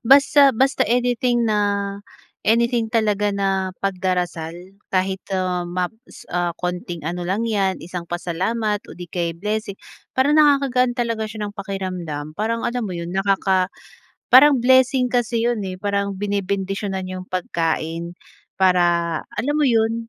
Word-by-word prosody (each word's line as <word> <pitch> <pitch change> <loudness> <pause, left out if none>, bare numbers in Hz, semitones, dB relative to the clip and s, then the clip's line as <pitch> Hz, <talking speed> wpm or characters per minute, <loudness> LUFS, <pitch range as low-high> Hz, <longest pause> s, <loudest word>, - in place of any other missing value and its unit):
basta 275 +1 +6
basta 265 +4 +2
anything 245 0 +1
na, 200 -2 0 0.5
anything 235 +1 +2
talaga 210 -3 +1
na, 195 -1 0
pagdarasal 180 -4 -1 0.4
kahit, 190 0 0
ah, 185 -1 0
maps 185 +7 -5
ah, 175 -1 0
konting 175 -2 -4
ano 175 +2 -3
lang 195 +5 0
yan, 200 -4 0
isang 175 0 -6
pasalamat 195 +5 -1
o - - -9
'di 175 0 -8
kaya 170 -2 -2
blessing, 210 +2 -3 0.4
parang 285 +4 +4
nakakagaan 270 -4 +3
talaga 230 -3 -1
siya 215 -1 -5
ng 205 - -7
pakiramdam. 185 -7 -5
Parang, 230 +2 -1
alam 245 0 -1
mo 185 - -5
'yon, 170 +1 -5
nakaka 190 -1 +1 0.6
parang 275 +2 +8
blessing 260 0 +4
kasi 240 -2 0
'yon 235 -3 -1
eh. 185 - -4
Parang 200 0 -1
binebendisyonan 195 -1 -2
'yong 185 0 -6
pagkain, 165 -1 -2 0.4
para, 175 -3 +3 0.2
alam 265 +7 -1
mo 300 - +3
'yon, 230 -1 +1
200 Hz, 135 wpm, -21 LUFS, 180-230 Hz, 0.6 s, parang